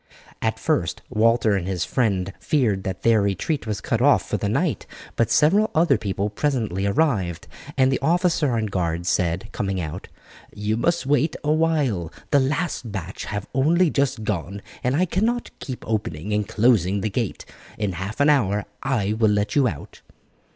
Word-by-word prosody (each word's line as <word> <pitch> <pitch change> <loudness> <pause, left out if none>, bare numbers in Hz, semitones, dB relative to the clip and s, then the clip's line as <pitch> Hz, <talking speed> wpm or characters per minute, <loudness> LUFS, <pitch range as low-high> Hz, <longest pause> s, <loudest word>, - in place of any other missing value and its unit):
At - - 0
first - - -1
Walter 110 -1 +3
and 95 -2 -2
his 90 -4 -1
friend 100 - 0
feared 120 - +1
that 95 -1 -4
their 115 -2 +4
retreat 100 - -1
was 105 -2 -3
cut - - -1
off - - +4
for - - -1
the - - -2
night, - - -1 0.3
but 115 - +1
several 200 +9 +4
other 165 +2 +4
people 100 0 -2
presently 110 -7 -1
arrived, 100 - 0 0.3
and 130 0 +4
the 130 - 0
officer 165 -2 +2
on 110 -2 0
guard 85 -4 -2
said, 90 +4 0
coming 95 -2 -2
out, 85 +2 -5 0.5
"You 105 +1 -1
must 170 +7 0
wait 145 +3 +2
a 150 - +1
while; 150 - +1 0.2
the 145 - +5
last 140 -3 -1
batch 95 -2 -5
have 100 -1 -4
only 160 +6 +3
just 135 -5 0
gone, 100 -1 -3 0.2
and 125 +2 +1
I 180 +5 +3
cannot 225 +7 -1
keep 130 -3 -7
opening 105 -4 -2
and 105 0 0
closing 105 -4 +2
the 110 - -1
gate; 115 0 -3 0.3
in 105 -2 -1
half 95 +6 -5
an 145 - +4
hour 105 -7 +1 0.2
I 110 -7 0
will 110 0 +2
let 105 0 0
you 140 -3 +4
out." 80 - -7
110 Hz, 175 wpm, -23 LUFS, 95-140 Hz, 0.5 s, the